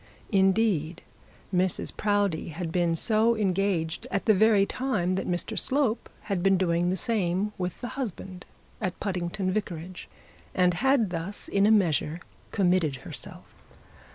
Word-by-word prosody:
Indeed 190 Hz, -5 st, +2 dB, 0.5 s
Mrs 180 Hz, 0 st, 0 dB
Proudie 205 Hz, -5 st, 0 dB
had 165 Hz, +1 st, -5 dB
been 170 Hz, -1 st, +1 dB
so 220 Hz, +5 st, +3 dB
engaged 185 Hz, -5 st, 0 dB
at 200 Hz, -, -2 dB
the 220 Hz, -, +6 dB
very 210 Hz, 0 st, +4 dB
time 210 Hz, -7 st, -1 dB
that 190 Hz, -, -2 dB
Mr 175 Hz, -1 st, -1 dB
Slope 260 Hz, -5 st, 0 dB
had 200 Hz, -4 st, -2 dB
been 195 Hz, +1 st, +4 dB
doing 175 Hz, -1 st, +1 dB
the 185 Hz, -, 0 dB
same 205 Hz, -2 st, 0 dB
with 180 Hz, -1 st, -2 dB
her 245 Hz, -, -3 dB
husband 195 Hz, -8 st, -6 dB, 0.3 s
at 185 Hz, -3 st, -3 dB
Puddingdale 185 Hz, 0 st, -2 dB
Vicarage, 185 Hz, -3 st, -5 dB, 0.5 s
and 180 Hz, -1 st, +3 dB
had 245 Hz, 0 st, +2 dB
thus 180 Hz, +4 st, -5 dB
in 200 Hz, +1 st, +3 dB
a -, -, +5 dB
measure 165 Hz, -6 st, +2 dB, 0.3 s
committed 180 Hz, -7 st, +2 dB
herself. -, -, -7 dB
190 Hz, 140 wpm, -27 LUFS, 175-210 Hz, 0.5 s, the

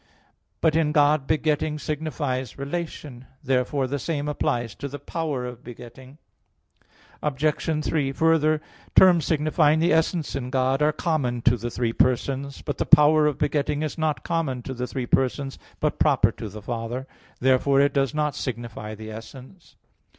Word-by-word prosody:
But 160 Hz, -1 st, +3 dB
in 155 Hz, -2 st, +2 dB
God, 145 Hz, -2 st, +3 dB
begetting 155 Hz, 0 st, 0 dB
signifies 145 Hz, -5 st, -3 dB
relation. 140 Hz, -3 st, -6 dB, 0.2 s
Therefore, 130 Hz, +1 st, 0 dB
the 140 Hz, +2 st, -3 dB
same 145 Hz, 0 st, -2 dB
applies 120 Hz, -6 st, -1 dB
to 140 Hz, -, -6 dB
the 145 Hz, +1 st, -7 dB
power 145 Hz, -2 st, -3 dB
of 125 Hz, -1 st, -8 dB
begetting. 125 Hz, +3 st, -12 dB, 1.0 s
Obj. 150 Hz, +2 st, -1 dB
3: 140 Hz, -4 st, 0 dB
Further, 155 Hz, +1 st, +2 dB, 0.3 s
terms 175 Hz, -5 st, +6 dB
signifying 155 Hz, 0 st, +2 dB
the 165 Hz, 0 st, +3 dB
essence 160 Hz, -1 st, 0 dB
in 125 Hz, -2 st, -4 dB
God, 130 Hz, +1 st, +1 dB
are 150 Hz, +1 st, +4 dB
common 135 Hz, -8 st, -1 dB
to 120 Hz, -, +4 dB
the 120 Hz, +1 st, -4 dB
three 120 Hz, -1 st, -1 dB
persons. 135 Hz, +3 st, 0 dB
But 145 Hz, -, -4 dB
the -, -, +1 dB
power 150 Hz, 0 st, +6 dB
of 150 Hz, -, -1 dB
begetting 150 Hz, 0 st, 0 dB
is 155 Hz, -, -3 dB
not 155 Hz, -2 st, -1 dB
common 135 Hz, -7 st, -2 dB
to 130 Hz, -, -5 dB
the 125 Hz, 0 st, -4 dB
three 130 Hz, -1 st, -4 dB
persons, 135 Hz, +2 st, 0 dB, 0.2 s
but -, -, -1 dB
proper -, -, +4 dB
to 110 Hz, -, -7 dB
the 105 Hz, +1 st, -10 dB
Father. 120 Hz, +3 st, -4 dB, 0.3 s
Therefore 130 Hz, +2 st, +3 dB
it 140 Hz, 0 st, +3 dB
does 135 Hz, 0 st, 0 dB
not 150 Hz, -1 st, 0 dB
signify 115 Hz, -4 st, -5 dB
the 110 Hz, +1 st, -9 dB
essence. 125 Hz, -, -12 dB
140 Hz, 160 wpm, -24 LUFS, 125-155 Hz, 1.0 s, terms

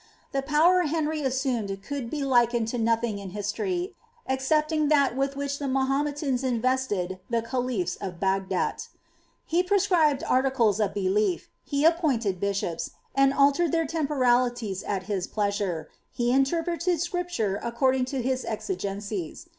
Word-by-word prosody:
The 275 Hz, -, 0 dB
power 310 Hz, +6 st, +4 dB
Henry 310 Hz, 0 st, -1 dB
assumed 250 Hz, -7 st, -1 dB
could 280 Hz, -5 st, -4 dB
be 295 Hz, +1 st, -3 dB
likened 240 Hz, -3 st, +3 dB
to 245 Hz, -, -2 dB
nothing 230 Hz, -2 st, +1 dB
in 195 Hz, -1 st, -7 dB
history, 350 Hz, -, -2 dB, 0.3 s
excepting 305 Hz, +4 st, +1 dB
that 280 Hz, -4 st, +3 dB
with 275 Hz, +1 st, -1 dB
which 280 Hz, 0 st, -3 dB
the 285 Hz, -, -3 dB
Maho 270 Hz, +1 st, +1 dB
metans 285 Hz, -3 st, -2 dB
invested 240 Hz, -7 st, 0 dB
the 230 Hz, -1 st, 0 dB
khaliffi 245 Hz, -5 st, -2 dB
of 180 Hz, -3 st, -5 dB
Bagdat 190 Hz, 0 st, -1 dB, 0.6 s
He 340 Hz, +2 st, +2 dB
prescribed 360 Hz, -7 st, +2 dB
articles 255 Hz, -5 st, +2 dB
of 205 Hz, -2 st, 0 dB
belief^ 195 Hz, -2 st, +1 dB, 0.2 s
he 285 Hz, +1 st, 0 dB
appointed 265 Hz, -, +2 dB
bishops, 200 Hz, -4 st, -2 dB, 0.2 s
and 275 Hz, 0 st, +4 dB
altered 280 Hz, +4 st, +3 dB
their 330 Hz, -1 st, +1 dB
temporalities 250 Hz, -, +1 dB
at 195 Hz, -2 st, -3 dB
his 190 Hz, -2 st, -2 dB
pleasure;* 200 Hz, -6 st, -1 dB, 0.2 s
he 240 Hz, 0 st, 0 dB
interpreted 335 Hz, +6 st, +1 dB
Scripture 345 Hz, -, -1 dB
according 255 Hz, +2 st, +1 dB
to 255 Hz, -1 st, -3 dB
his 260 Hz, 0 st, 0 dB
exigencies. 200 Hz, -, -4 dB
255 Hz, 140 wpm, -26 LUFS, 210-290 Hz, 0.6 s, power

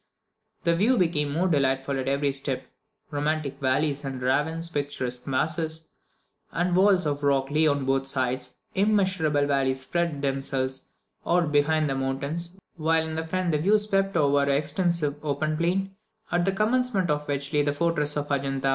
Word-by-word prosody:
The 170 Hz, 0 st, +3 dB
view 225 Hz, +9 st, +3 dB
became 155 Hz, -6 st, +1 dB
more 170 Hz, +6 st, +1 dB
delightful 135 Hz, -3 st, +1 dB
at 130 Hz, -, -3 dB
every 140 Hz, +1 st, +1 dB
step: 135 Hz, -1 st, -1 dB, 0.5 s
romantic 145 Hz, -1 st, -2 dB
valleys 140 Hz, +2 st, 0 dB
and 135 Hz, -2 st, -4 dB
ravines, 150 Hz, +6 st, 0 dB
picturesque 140 Hz, -5 st, -3 dB
masses 160 Hz, +4 st, -1 dB, 0.7 s
and 175 Hz, +1 st, 0 dB
walls 190 Hz, -1 st, +4 dB
of 145 Hz, -1 st, -1 dB
rock 140 Hz, -1 st, +1 dB
lay 155 Hz, +1 st, +3 dB
on 140 Hz, -2 st, +1 dB
both 135 Hz, 0 st, +1 dB
sides, 130 Hz, -1 st, -1 dB, 0.2 s
immeasurable 185 Hz, -8 st, +2 dB
valleys 135 Hz, -2 st, 0 dB
spread 165 Hz, 0 st, -2 dB
themselves 135 Hz, -1 st, -2 dB, 0.4 s
out 170 Hz, -3 st, +1 dB
behind 150 Hz, +1 st, +2 dB
the 135 Hz, -, -1 dB
mountains, 140 Hz, +7 st, -3 dB, 0.2 s
while 160 Hz, 0 st, +2 dB
in 160 Hz, 0 st, -3 dB
front 185 Hz, 0 st, -1 dB
the 150 Hz, -, +1 dB
view 200 Hz, +7 st, +4 dB
swept 195 Hz, -3 st, +1 dB
over 145 Hz, -2 st, +3 dB
an 140 Hz, -, +1 dB
extensive 155 Hz, 0 st, 0 dB
open 155 Hz, +1 st, -1 dB
plain, 190 Hz, +4 st, -1 dB, 0.4 s
at 175 Hz, 0 st, +2 dB
the 195 Hz, -, +4 dB
commencement 215 Hz, -3 st, +1 dB
of 150 Hz, 0 st, -2 dB
which 140 Hz, +1 st, -3 dB
lay 150 Hz, -, +4 dB
the 145 Hz, 0 st, +1 dB
fortress 150 Hz, -1 st, 0 dB
of 145 Hz, 0 st, -3 dB
Adjunta. 135 Hz, -1 st, 0 dB
150 Hz, 165 wpm, -26 LUFS, 140-170 Hz, 0.7 s, walls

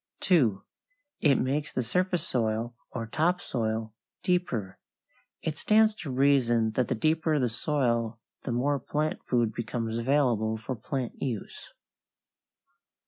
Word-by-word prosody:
2. 125 Hz, -, +3 dB, 0.6 s
It 145 Hz, -3 st, +4 dB
makes 145 Hz, +4 st, 0 dB
the 125 Hz, -, -1 dB
surface 180 Hz, +8 st, 0 dB
soil, 115 Hz, 0 st, -1 dB
or 115 Hz, -3 st, -4 dB
topsoil, 115 Hz, -7 st, -1 dB, 0.3 s
deeper. 125 Hz, -, -1 dB, 0.6 s
It 155 Hz, -2 st, -3 dB
stands 215 Hz, 0 st, +4 dB
to 160 Hz, -, -6 dB
reason 125 Hz, -4 st, +3 dB
that 125 Hz, +2 st, 0 dB
the 130 Hz, -, 0 dB
deeper 160 Hz, +4 st, +1 dB
the 125 Hz, -4 st, +1 dB
soil 120 Hz, -3 st, 0 dB, 0.2 s
the 130 Hz, -, -4 dB
more 135 Hz, +4 st, +1 dB
plant 150 Hz, +4 st, -2 dB
food 120 Hz, -3 st, +2 dB
becomes 115 Hz, 0 st, -3 dB
available 115 Hz, -4 st, +2 dB
for 120 Hz, +4 st, -4 dB
plant 125 Hz, +2 st, -4 dB
use. 120 Hz, -7 st, -5 dB
125 Hz, 125 wpm, -28 LUFS, 115-150 Hz, 0.6 s, It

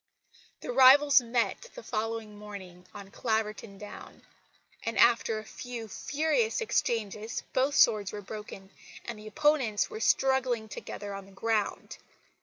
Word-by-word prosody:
The -, -, -4 dB
rivals 270 Hz, +2 st, +7 dB
met 240 Hz, -, -1 dB
the -, -, -9 dB
following 220 Hz, -1 st, -3 dB
morning 190 Hz, -4 st, -10 dB
on 200 Hz, -1 st, -11 dB
Claverton 220 Hz, -3 st, -2 dB
Down; 210 Hz, +1 st, -11 dB, 0.6 s
and 230 Hz, 0 st, -3 dB
after 230 Hz, -2 st, +4 dB
a 215 Hz, -, -6 dB
few 235 Hz, 0 st, -7 dB
furious 315 Hz, -, 0 dB
exchanges 225 Hz, -, -1 dB
both 270 Hz, +2 st, +1 dB
swords 205 Hz, -3 st, +4 dB
were 205 Hz, -1 st, -7 dB
broken, 200 Hz, -1 st, -9 dB, 0.3 s
and 230 Hz, -3 st, -6 dB
the 215 Hz, -, -10 dB
opponents 270 Hz, -5 st, +1 dB
were -, -, -6 dB
struggling 255 Hz, -2 st, +2 dB
together 205 Hz, -1 st, -7 dB
on 195 Hz, 0 st, -8 dB
the -, -, -16 dB
ground. 215 Hz, +2 st, -2 dB
225 Hz, 135 wpm, -29 LUFS, 210-255 Hz, 0.6 s, rivals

